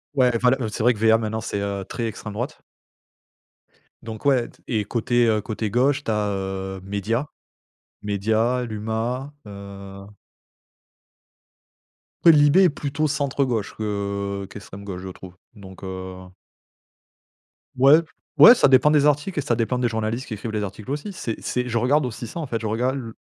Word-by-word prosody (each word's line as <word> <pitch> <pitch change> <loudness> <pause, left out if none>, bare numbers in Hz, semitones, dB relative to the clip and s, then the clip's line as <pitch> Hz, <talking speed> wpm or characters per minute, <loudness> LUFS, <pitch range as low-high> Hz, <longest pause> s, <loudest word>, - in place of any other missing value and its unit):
Ouais. 125 -2 +4
Enfin 125 +2 +3
le, 130 +1 +1
heu, 110 - -2
c'est 105 +2 -5
vrai 125 +1 +5
que 105 - -10
VA 110 0 +5
maintenant 110 0 -3
c'est, 100 - -3
heu, 100 -1 -3
très 115 -2 -3
extrême 105 -1 -7
droite. 120 +9 -4 1.4
Donc 110 -2 -8
ouais 130 -4 +3
t - - -21
et 110 -3 -1
côté, 120 +2 +1
heu, 110 -1 +2
côté 110 0 -3
gauche 135 +6 +2
tu - - 0
as, 105 -1 0
heu, 95 0 -4
Médias, 100 +7 -2 0.8
Médias, 110 +5 0
l'Huma, 115 +5 -3 0.2
heu 100 -1 -10 2.2
Après 165 - +9
Libé 145 +6 +6
est 180 - +6
plutôt 145 +1 -2
centre 140 -1 0
gauche 110 -5 -2
que 100 -2 -3
qu'extrême 100 0 -10
gauche, 95 -2 -6
je 95 - -6
trouve 95 0 -10 0.2
donc, 95 -3 -13
heu 95 0 -6 1.6
Ouais. 140 +5 +7 0.4
Ouais 240 - +10
ça 235 - +4
dépend 130 +2 +6
des 150 -1 +4
articles 150 +4 +1
et - - +2
ça 120 - 0
dépend 115 +2 0
des 120 - +1
journalistes 110 +3 -2
qui - - -5
écrivent 110 +2 -5
les 105 -1 -2
articles 100 +3 -7
aussi. 150 +8 -3
C'est 115 - -4
c'est 125 0 -2
je 120 -1 -1
regarde 135 +5 +2
aussi 120 -1 -5
ça 120 - -7
en 155 - -4
fait, 115 -3 -2
je 110 - -2
regarde 125 +5 0
l 115 -4 -6
115 Hz, 180 wpm, -23 LUFS, 100-130 Hz, 2.2 s, Ouais